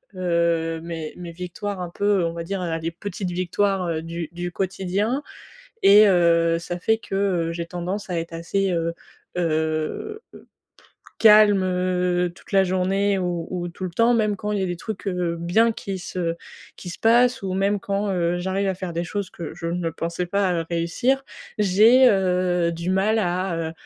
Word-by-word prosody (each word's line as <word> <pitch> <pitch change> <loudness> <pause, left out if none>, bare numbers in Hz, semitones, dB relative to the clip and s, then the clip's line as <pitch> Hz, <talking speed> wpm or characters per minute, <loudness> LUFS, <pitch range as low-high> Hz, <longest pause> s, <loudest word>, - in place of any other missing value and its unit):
heu, 170 -2 0
mes 165 -2 -6
mes 175 -1 -7
victoires 180 +3 -5
un 175 - -4
peu, 200 0 +1
on 165 - -2
va 170 0 -5
dire, 195 +2 -3
voilà, 165 -2 -2
les 165 +1 -3
petites 180 +1 -5
victoires, 185 +1 0
heu, 160 -2 -2
du 165 -1 -5
du 175 0 -4
quotidien 195 +8 -1 0.6
et 210 +2 +8
heu, 170 -3 +4
ça 175 +1 -5
fait 220 +4 +2
que, 225 - -10 0.3
heu, 165 - -2
j'ai 170 0 -4
tendance 180 +3 -4
à 175 - -1
être 165 0 -7
assez, 185 +4 -1
heu 165 -1 -1 0.5
heu, 160 - -1 1.0
calme, 210 -3 +7
heu, 180 -1 0
toute - - -18
la 195 -1 +4
journée 190 +2 +1
ou 175 -2 -2
ou 175 -1 -3
tout 185 +2 -7
le 185 - -3
temps, 230 +7 +3
même 215 -3 +2
quand 210 +1 -4
il 210 - 0
y - - 0
a - - 0
des 175 - -2
trucs, 210 +3 -7
heu, 180 -3 -1
bien 180 +8 +3
qui 195 -3 -5
se 175 -2 -3 0.4
qui 180 - -10
se - - -8
passent 240 +2 +4
ou 190 -1 -3
même 200 +2 +1
quand, 200 +1 -2
heu, 175 -1 0
j'arrive 190 +2 -1
à 190 - 0
faire 185 -1 -5
des 170 +1 -2
choses 200 +1 -4
que 170 - -7
je 165 - -6
ne 170 -1 -2
pensais 170 +2 -3
pas 180 -3 0
réussir. 175 +11 0 0.4
J'ai, 215 +6 +6
heu, 180 -3 +1
du 170 +2 -3
mal 210 +4 +2
à, 180 -1 -1
heu, - - -7
180 Hz, 190 wpm, -23 LUFS, 170-200 Hz, 1.0 s, et